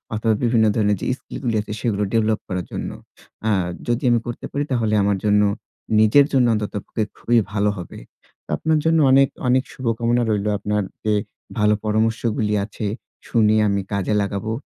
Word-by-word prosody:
অথবা 110 +1 +1
বিভিন্ন 115 -2 +3
ধরনের 105 -3 +2
যে - - -3
স্কিল - - -9
গুলো 120 -3 0
আছে 105 - -9
সেগুলো 105 -4 0
ডেভেলপ 110 -1 +2
করার 90 -2 -3
জন্য। - - -4 0.6
আ - - +3 0.4
যদি 120 +1 0
আমি 120 - +4
করতে 120 - -5
পারি 145 - -1
তাহলে 115 -4 +1
আমার 100 0 +1
জন্য 105 0 +4 0.6
নিজের 115 +7 +6
জন্য 130 -2 +4
অন্তত 105 -1 -2
পক্ষে 110 - -2
খুবই 120 0 +1 0.2
ভালো 105 0 +2
হবে। 90 - -8 0.5
তো - - -45
আপনার 160 -1 +1
জন্য 165 0 +4
অনেক, 135 +1 +6 0.2
অনেক 130 +1 +3
শুভকামনা 120 -1 0
রইলো। 105 -1 0
আপনার 105 0 -1 0.2
যে 105 - +2 0.5
ভালো 105 0 +4
পরামর্শগুলি 110 0 0
আছে 105 0 -6 0.4
শুনে 110 -2 +3
আমি 100 -1 +1
কাজে 100 +1 0
লাগাবো। 100 +2 -3
110 Hz, 170 wpm, -21 LUFS, 105-120 Hz, 0.6 s, নিজের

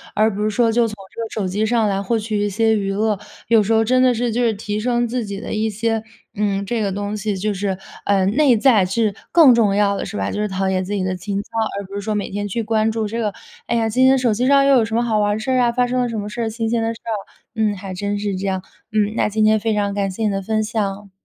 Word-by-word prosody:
而 215 0 +3
不 210 - -3
是 215 - +1
说 230 +1 +2
就 235 0 +2
从 215 - -7 0.2
这 230 - -6
个 225 - -4
手 205 -4 -3
机 205 +4 -1
上 225 -1 +2
来 195 -1 0
获 225 +4 0
取 215 -1 -2
一 205 - 0
些 220 +2 +2
娱 195 -2 -1
乐。 210 0 0 0.3
有 225 -1 +5
时 220 +3 +1
候 225 0 +4
真 255 +2 +3
的 255 -1 +5
是， 240 0 -1
就 240 +3 0
是 230 -2 +2
提 210 +1 -3
升 240 +1 0
自 245 0 -2
己 200 -1 -5
的 225 - -6
一 220 +1 0
些， 225 +1 -1 0.3
嗯， 200 -1 -1
这 230 +2 -1
个 200 -2 0
东 205 +2 -3
西 210 -1 -2
就 210 +2 -1
是， 195 -1 -2 0.3
呃， 195 -2 +2
内 250 +4 +3
在 225 -5 +4
是 210 +3 0 0.2
更 315 -7 +7
重 215 -4 +3
要 200 -1 +2
的 - - -3
是 - - -6
吧？ 95 0 -2
就 210 - -2
是 210 - 0
陶 190 0 -2
冶 190 -1 +1
自 190 +2 -6
己 200 -2 -1
的 185 0 -1
情 195 +2 -3
操， - - -23 0.3
而 200 - -5
不 195 - -13
是 200 - -3
说 215 +1 -2
每 205 - -3
天 205 +1 -3
去 230 +4 -2
关 220 0 +1
注 220 -1 -2
这 230 +3 -4
个， 215 -3 0 0.4
哎 235 - 0
呀， 225 -1 +1
今 250 +4 +2
天 265 +1 +6
手 245 -4 +2
机 250 +4 0
上 275 0 +5
又 275 0 +5
有 235 - +4
什 225 0 -3
么 235 - +2
好 220 -3 +1
玩 205 0 +1
的 - - -4
事 240 +4 -2
儿 255 - +3
啊， 240 -1 +3
发 250 +1 +1
生 250 +1 0
了 245 - 0
什 225 - -4
么 205 - -4
事 210 +3 -5
儿， 225 - -1
新 225 0 -3
鲜 230 0 0
的 225 0 0
事 230 - -9
儿。 230 - -3 0.4
嗯， 215 -2 +1
还 190 0 -7
真 205 +2 -2
是 205 -1 -2
这 195 +1 -3
样， 190 -1 -2 0.3
嗯， 210 -1 +1
那 - - +2
今 215 +1 0
天 215 0 +4
非 220 0 0
常 200 -1 0
感 200 -1 -1
谢 205 +4 -4
你 215 - +2
的 195 -1 -2
分 215 +2 0
享。 205 -2 -3
215 Hz, 330 characters per minute, -20 LUFS, 200-230 Hz, 0.4 s, 更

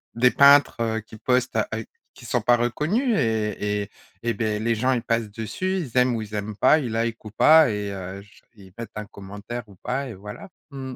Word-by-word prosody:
des 125 +2 +4
peintres, 140 +1 +6
heu, 110 -1 0
qui 110 +1 -14
postent 125 +2 0
à 110 - +1
heu, 110 -1 -5 0.3
qui 120 - -14
sont 120 +1 0
pas 120 +3 +4
reconnus 170 - 0
et 105 -2 -1
et 100 - -11 0.3
et 120 0 0
beh 110 -3 -1
les 115 +1 0
gens 125 +4 +1
ils 125 -2 +1
passent 115 -2 -1
dessus, 115 - -3
ils 130 -8 -5
aiment 125 -1 +4
ou 110 - -3
ils 105 0 -9
aiment 105 +1 -4
pas, 155 - +5
ils 125 -6 -4
likent 115 0 -2
ou 105 - -8
pas 155 +5 +6
et, 105 -1 -3
heu, 95 0 -7
j 100 0 -20
ils 95 -3 -16
mettent 115 -2 -7
un 105 - -5
commentaire 100 +4 -8
ou 100 - -16
pas 135 +2 -3
et 115 - -7
voilà. 105 - -10 0.2
Mmh. 130 -2 -7
115 Hz, 230 wpm, -24 LUFS, 105-125 Hz, 0.3 s, peintres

